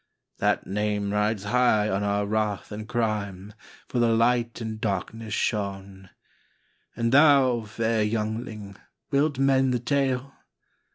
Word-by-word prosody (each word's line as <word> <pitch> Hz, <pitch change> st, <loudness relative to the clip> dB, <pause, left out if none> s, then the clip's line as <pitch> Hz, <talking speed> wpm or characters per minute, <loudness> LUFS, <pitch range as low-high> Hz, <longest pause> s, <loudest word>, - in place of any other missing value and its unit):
" -, -, -59 dB
That -, -, +1 dB
name 105 Hz, 0 st, -1 dB
rides 105 Hz, -1 st, 0 dB
high 110 Hz, -1 st, +2 dB
on 95 Hz, -1 st, -1 dB
our 100 Hz, 0 st, 0 dB
wrath 105 Hz, -1 st, -2 dB
and 105 Hz, +1 st, -7 dB
crime, 105 Hz, -4 st, -2 dB, 0.3 s
For 125 Hz, -, -2 dB
the 120 Hz, -, +4 dB
Light 115 Hz, +1 st, +1 dB
in 110 Hz, -2 st, -5 dB
darkness 110 Hz, +1 st, -3 dB
shone. 95 Hz, -3 st, -3 dB, 0.4 s
" -, -, -42 dB
And 115 Hz, 0 st, 0 dB
thou, 135 Hz, -5 st, +5 dB
fair 110 Hz, +1 st, -1 dB
youngling, 105 Hz, -1 st, -3 dB, 0.3 s
wilt 140 Hz, 0 st, +1 dB
mend 135 Hz, -1 st, +3 dB
the -, -, 0 dB
tale? 135 Hz, 0 st, -1 dB
110 Hz, 135 wpm, -25 LUFS, 105-125 Hz, 0.4 s, thou